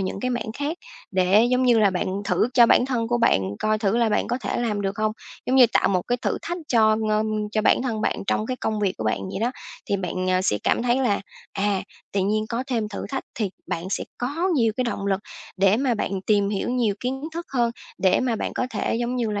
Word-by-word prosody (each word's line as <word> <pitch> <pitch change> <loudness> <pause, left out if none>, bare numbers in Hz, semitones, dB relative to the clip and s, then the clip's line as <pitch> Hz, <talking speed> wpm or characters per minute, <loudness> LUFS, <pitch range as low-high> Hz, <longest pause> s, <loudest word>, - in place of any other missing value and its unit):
những 190 +1 -3
cái 255 - -1
mảng 240 -3 -3
khác 290 +4 -3 0.3
để, 190 +3 +4
giống 255 0 +3
như 245 -2 +5
là, 205 -2 +4
bạn 180 - -2 0.2
thử 225 - +1
cho 240 -2 +7
bản 245 - +4
thân 235 -4 -1
của 240 0 +1
bạn 230 - +3 0.2
coi 215 0 +1
thử 210 0 +1
là 235 -1 +3
bạn 210 - +1
có 245 - -1
thể - - -3
làm 215 -4 -1
được 195 0 -2
hông, 215 0 +1 0.3
giống 260 - +2
như, 250 - +8
tạo - - +3
một 185 -2 +1
cái 245 - -1
thử - - 0
thách 345 +1 -3
cho, 220 -2 +4
ưm, 215 0 0
cho 215 -1 +1
bản - - +4
thân 230 -5 -2
bạn - - -1
trong 215 - 0
cái 255 +1 -2
công 215 -3 -2
việc 195 -2 +1
của 110 - -4
bạn 110 - +1
vậy - - -4
đó. 235 +2 +1 0.4
Thì 200 - +1
bạn, 185 0 -2
à, 185 0 +2
sẽ 105 - +1
cảm - - +1
thấy 240 0 +2
là, 210 -6 +1 0.3
à, 200 -1 0 0.3
tự 200 - +1
nhiên 215 +3 0
có 235 +2 -2
thêm 230 -5 -1
thử 210 - -5
thách 270 - -3
thì 210 -4 -1 0.2
bạn 165 - -3
sẽ - - -1
có 295 +9 -1
nhiều 230 -5 +3
cái 255 - 0
động 200 -4 -3
lực 195 -1 +1 0.4
để 195 +2 +4
mà 255 -1 +1
bạn 195 -3 -2
tìm 205 -2 +3
hiểu 200 +2 -2
nhiều 240 -5 +1
kiến 265 +2 -3
thức 340 +1 -5
hơn, 240 -3 +2 0.3
để 185 0 +3
mà 245 -3 0
bạn - - -3
có - - -1
thể, 225 - -1
giống 240 +1 -1
như 230 -3 0
là, 205 - -2
220 Hz, 260 wpm, -24 LUFS, 200-245 Hz, 0.4 s, như